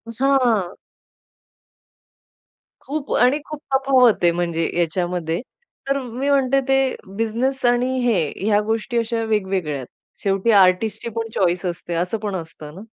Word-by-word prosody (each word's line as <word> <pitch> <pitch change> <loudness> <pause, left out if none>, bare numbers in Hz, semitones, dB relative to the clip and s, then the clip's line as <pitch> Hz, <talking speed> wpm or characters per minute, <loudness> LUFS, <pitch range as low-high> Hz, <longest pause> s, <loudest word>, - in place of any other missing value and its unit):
हां. 245 -8 +2 2.1
खूप 285 0 -5
आणि 255 +4 +4
खूप 305 -1 -7
तफावत 260 -7 +4
आहे 170 - +5
म्हणजे 170 -1 -1
याच्यामध्ये. 175 0 -1 0.5
तर 275 0 +1
मी 255 +3 -3
म्हणते 275 -1 +3
ते 270 0 +4 0.4
बिझनेस 240 +4 -1
आणि 245 +2 +2
हे 235 -5 +3 0.3
ह्या 210 -1 +3
गोष्टी 225 +2 -2
अशा 230 0 -1
वेगवेगळ्या 190 -8 -1
आहेत. 130 -2 -8 0.4
शेवटी 195 +3 +1
आर्टिस्टची 205 +3 +3
पण 225 0 -3
चॉईस 180 -1 +1
असते 175 -1 -4
असं 180 +6 -1
पण 205 -2 -4
असतं 160 -3 -8
ना. 190 - -9
220 Hz, 135 wpm, -21 LUFS, 180-250 Hz, 2.1 s, आहे